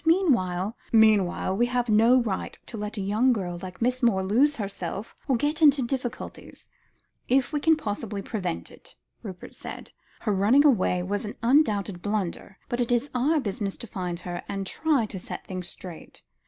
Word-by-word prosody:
Meanwhile 230 Hz, -, +2 dB
" -, -, -30 dB
"Meanwhile, 210 Hz, -4 st, +4 dB
we 240 Hz, +4 st, +2 dB
have 245 Hz, 0 st, 0 dB
no 225 Hz, +4 st, +5 dB
right 200 Hz, -5 st, -3 dB
to -, -, -9 dB
let 210 Hz, +1 st, -5 dB
a -, -, -1 dB
young 215 Hz, +7 st, +2 dB
girl 175 Hz, -5 st, -3 dB
like 185 Hz, +1 st, -6 dB
Miss 250 Hz, +1 st, +1 dB
Moore 210 Hz, -6 st, +3 dB
lose 255 Hz, +10 st, +3 dB
herself 200 Hz, -2 st, -5 dB
or 265 Hz, -, +3 dB
get 295 Hz, +6 st, -1 dB
into 285 Hz, -3 st, +6 dB
difficulties, 245 Hz, 0 st, -5 dB, 0.6 s
if 265 Hz, +3 st, +2 dB
we 295 Hz, -, +1 dB
can 320 Hz, +2 st, +4 dB
possibly 205 Hz, -4 st, -4 dB
prevent 185 Hz, -, -4 dB
it," -, -, -13 dB, 0.3 s
Rupert 185 Hz, -2 st, -9 dB
said. -, -, -8 dB, 0.3 s
"Her 210 Hz, -, 0 dB
running 220 Hz, +10 st, +4 dB
away 185 Hz, -9 st, +3 dB
was 200 Hz, +3 st, -2 dB
an 210 Hz, -, -6 dB
undoubted 215 Hz, -, +2 dB
blunder, 200 Hz, -2 st, -3 dB
but 245 Hz, -1 st, -1 dB
it 240 Hz, -, 0 dB
is 245 Hz, +4 st, +1 dB
our 285 Hz, +6 st, +2 dB
business 200 Hz, -4 st, -3 dB
to -, -, -6 dB
find 180 Hz, -4 st, -4 dB
her, 175 Hz, -1 st, -5 dB
and 195 Hz, -1 st, -3 dB
try 290 Hz, +2 st, +1 dB
to 200 Hz, -3 st, -6 dB
set -, -, -7 dB
things 185 Hz, -2 st, -5 dB
straight. 175 Hz, -4 st, -9 dB
215 Hz, 180 wpm, -26 LUFS, 190-255 Hz, 0.6 s, into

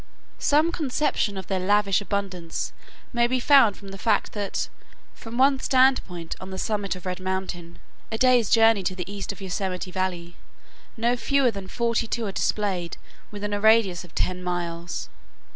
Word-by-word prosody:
Some 305 Hz, +3 st, +3 dB
conception 280 Hz, -, 0 dB
of 190 Hz, -, -5 dB
their 190 Hz, 0 st, -1 dB
lavish 200 Hz, +1 st, +2 dB
abundance 195 Hz, -5 st, -3 dB, 0.4 s
may 240 Hz, 0 st, +3 dB
be 255 Hz, +1 st, 0 dB
made 270 Hz, -8 st, +6 dB
from 200 Hz, -, -11 dB
the 195 Hz, 0 st, -9 dB
fact 225 Hz, -, +1 dB
that, 205 Hz, -2 st, -2 dB, 0.5 s
from 230 Hz, +1 st, -8 dB
one 270 Hz, +1 st, +4 dB
standpoint 255 Hz, -12 st, +2 dB
on 185 Hz, -, -7 dB
the 190 Hz, -, -6 dB
summit 205 Hz, -1 st, -1 dB
of 180 Hz, -, -11 dB
Red 180 Hz, 0 st, -3 dB
Mountain, 185 Hz, -2 st, -4 dB, 0.3 s
a 220 Hz, -, -1 dB
day's 250 Hz, -3 st, +4 dB
journey 225 Hz, -2 st, +5 dB
to 185 Hz, 0 st, -2 dB
the 180 Hz, -2 st, -5 dB
east 200 Hz, 0 st, -4 dB
of 200 Hz, -, -12 dB
Yosemite 185 Hz, -1 st, -3 dB
Valley, 180 Hz, -2 st, -3 dB, 0.6 s
no 235 Hz, +2 st, +2 dB
fewer 270 Hz, 0 st, +2 dB
than 195 Hz, -2 st, -7 dB
forty 235 Hz, +1 st, 0 dB
two 230 Hz, 0 st, -2 dB
are 200 Hz, -, -2 dB
displayed 190 Hz, -4 st, -1 dB, 0.3 s
within 205 Hz, 0 st, -4 dB
a 205 Hz, -, -1 dB
radius 220 Hz, -5 st, +4 dB
of 175 Hz, -, -16 dB
ten 180 Hz, 0 st, -1 dB
miles. 175 Hz, -1 st, -3 dB
200 Hz, 170 wpm, -25 LUFS, 185-230 Hz, 0.6 s, made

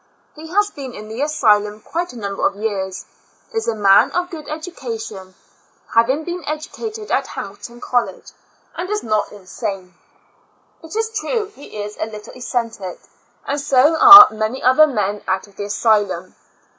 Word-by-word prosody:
He 315 Hz, +1 st, -10 dB
has 410 Hz, +5 st, +1 dB
been 265 Hz, -4 st, -8 dB
in 215 Hz, +1 st, -10 dB
the 225 Hz, +4 st, -5 dB
asylum 210 Hz, -8 st, +2 dB
quite 340 Hz, +10 st, -4 dB
a 245 Hz, -, -11 dB
number 200 Hz, -2 st, -5 dB
of -, -, -5 dB
years 195 Hz, -3 st, -4 dB, 0.2 s
— -, -, -36 dB
is 450 Hz, 0 st, -2 dB
a 230 Hz, -, 0 dB
man 200 Hz, -2 st, +5 dB
of 355 Hz, +2 st, -2 dB
good 310 Hz, -3 st, -8 dB
education, 225 Hz, -, -7 dB, 0.6 s
having 260 Hz, +7 st, +2 dB
been 350 Hz, +2 st, -5 dB
educa 310 Hz, +9 st, -5 dB
ted 430 Hz, 0 st, -9 dB
at -, -, +1 dB
Hamilton 235 Hz, +4 st, -9 dB
College, 245 Hz, -1 st, -2 dB, 0.4 s
and 360 Hz, +2 st, -5 dB
is 420 Hz, 0 st, -2 dB
not 215 Hz, -2 st, -1 dB
insane. 195 Hz, -2 st, -6 dB, 0.9 s
It 325 Hz, +5 st, -10 dB
is 445 Hz, 0 st, -1 dB
true 440 Hz, 0 st, -2 dB
he 275 Hz, -, -9 dB
is 210 Hz, 0 st, -8 dB
a -, -, -2 dB
little 210 Hz, 0 st, -10 dB
eccentric, 230 Hz, -7 st, -4 dB, 0.5 s
and 285 Hz, +1 st, -2 dB
so 285 Hz, +2 st, +3 dB
are 405 Hz, +3 st, +12 dB
many 220 Hz, +4 st, -3 dB
other 260 Hz, +5 st, +6 dB
men 210 Hz, -6 st, -2 dB
out 190 Hz, 0 st, -1 dB
of 200 Hz, -2 st, -23 dB
the 205 Hz, -, -4 dB
asylum. 205 Hz, -4 st, 0 dB
235 Hz, 170 wpm, -19 LUFS, 210-320 Hz, 0.9 s, are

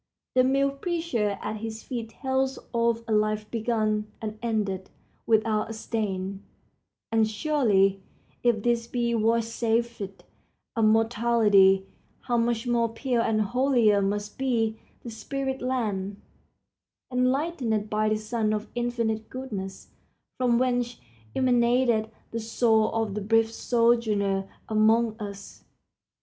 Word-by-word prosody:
The 255 Hz, -, +5 dB
mute 275 Hz, +1 st, +1 dB
preacher 325 Hz, -, -1 dB
at 215 Hz, -, -3 dB
his 220 Hz, 0 st, -6 dB
feet 235 Hz, -4 st, -5 dB
tells 265 Hz, +2 st, -1 dB, 0.2 s
of 230 Hz, 0 st, +1 dB
a -, -, -4 dB
life 215 Hz, 0 st, +1 dB
begun 215 Hz, -2 st, 0 dB
and 215 Hz, -1 st, -6 dB
ended 205 Hz, -5 st, -2 dB, 0.4 s
without 220 Hz, -1 st, +2 dB
a -, -, -4 dB
stain; 200 Hz, -4 st, -3 dB, 0.7 s
and 220 Hz, -1 st, +3 dB
surely 210 Hz, -6 st, +2 dB, 0.4 s
if 235 Hz, -4 st, +2 dB
this 235 Hz, -1 st, +1 dB
be 235 Hz, -1 st, -1 dB
vouchsafed 230 Hz, -2 st, 0 dB, 0.5 s
to 225 Hz, -, 0 dB
mortality, 215 Hz, -3 st, +4 dB, 0.4 s
how 240 Hz, -2 st, 0 dB
much 230 Hz, 0 st, 0 dB
more 235 Hz, -1 st, +1 dB
pure 235 Hz, +1 st, -1 dB
and 220 Hz, -1 st, +1 dB
holier 235 Hz, -2 st, +3 dB
must 205 Hz, +3 st, -2 dB
be 225 Hz, -4 st, 0 dB, 0.2 s
the 235 Hz, -, -7 dB
spirit 265 Hz, +3 st, -4 dB
land, 205 Hz, -6 st, -2 dB, 0.9 s
enlightened 255 Hz, -4 st, 0 dB
by 215 Hz, 0 st, +1 dB
the 215 Hz, -, +1 dB
sun 215 Hz, 0 st, -1 dB
of 215 Hz, +1 st, -4 dB
infinite 230 Hz, -2 st, -2 dB
goodness, 210 Hz, -8 st, -6 dB, 0.5 s
from 245 Hz, -2 st, +2 dB
whence 245 Hz, -1 st, 0 dB, 0.4 s
emanated 240 Hz, -3 st, +2 dB, 0.2 s
the 230 Hz, -, -3 dB
soul 225 Hz, -1 st, +2 dB
of 225 Hz, -3 st, -1 dB
that 205 Hz, -1 st, -4 dB
brief 225 Hz, 0 st, +3 dB
sojourner 220 Hz, -5 st, +1 dB, 0.2 s
among 220 Hz, +1 st, +3 dB
us! 200 Hz, -1 st, -8 dB
225 Hz, 120 wpm, -26 LUFS, 215-240 Hz, 0.9 s, The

